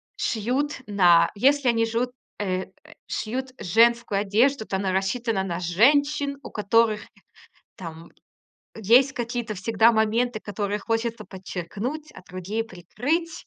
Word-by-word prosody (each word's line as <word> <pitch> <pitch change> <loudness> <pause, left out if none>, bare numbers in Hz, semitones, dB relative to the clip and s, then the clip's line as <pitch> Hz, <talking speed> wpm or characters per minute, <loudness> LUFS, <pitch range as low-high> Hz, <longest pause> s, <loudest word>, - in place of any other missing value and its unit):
шьют 255 +6 -1
на 180 -5 +5
если 275 +4 +3
они 230 -1 +2
жут 235 +2 -1 0.3
э, 185 -2 -1
э, - - -23 0.4
шьют 255 +4 -3
женскую 230 +1 +3
одежду, 220 +5 +2
то 190 - -2
она 190 -1 -1
рассчитана 195 +1 -1
на 175 -2 -3
женщин, 280 - +2
у - - -8
которых, 215 +1 +2 0.8
там, 165 -2 -9 0.7
есть 240 +6 +4
какие-то 240 -2 -3
всегда 220 +4 +3
моменты, 220 +2 +1
которые 205 0 -3
хочется 225 0 -2
подчеркнуть, 205 - -6
а - - -13
другие 185 +5 -4
прикрыть. 250 - -3
225 Hz, 125 wpm, -24 LUFS, 195-245 Hz, 0.8 s, на